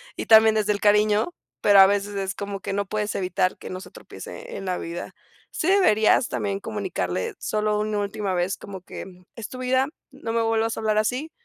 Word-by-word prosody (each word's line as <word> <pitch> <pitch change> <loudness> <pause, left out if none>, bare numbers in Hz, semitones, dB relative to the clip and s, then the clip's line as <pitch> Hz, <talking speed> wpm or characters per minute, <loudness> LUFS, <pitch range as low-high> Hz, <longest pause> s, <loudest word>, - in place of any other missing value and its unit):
y - - -4
también 220 0 +7
desde 210 -1 +1
el 200 - -4
cariño, 210 +7 +3 0.3
pero 205 -1 +6
a 190 - +10
veces 205 0 -1
es 195 0 -2
como 200 -1 -5
que 200 - -4
no 200 0 -1
puedes 210 +1 -2
evitar 185 0 0
que - - -9
no 185 0 -6
se - - -12
tropiece - - -10
en 195 - -7
la 180 -1 -1
vida. 170 +1 -6 0.4
Sí 320 - -2
deberías 250 - +4
también 200 -1 -2
comunicarle 130 - -3
solo 210 0 0
una 215 0 -1
última 200 -1 -2
vez, 180 +2 0
como 195 -3 -9
que - - -8 0.3
es 230 -3 -7
tu 255 - -8
vida, 260 +1 +1 0.2
no 270 -4 -6
me 230 - +2
vuelvas 225 0 0
a - - -3
hablar 215 -1 +1
así, 250 +9 -1
210 Hz, 210 wpm, -24 LUFS, 195-220 Hz, 0.4 s, a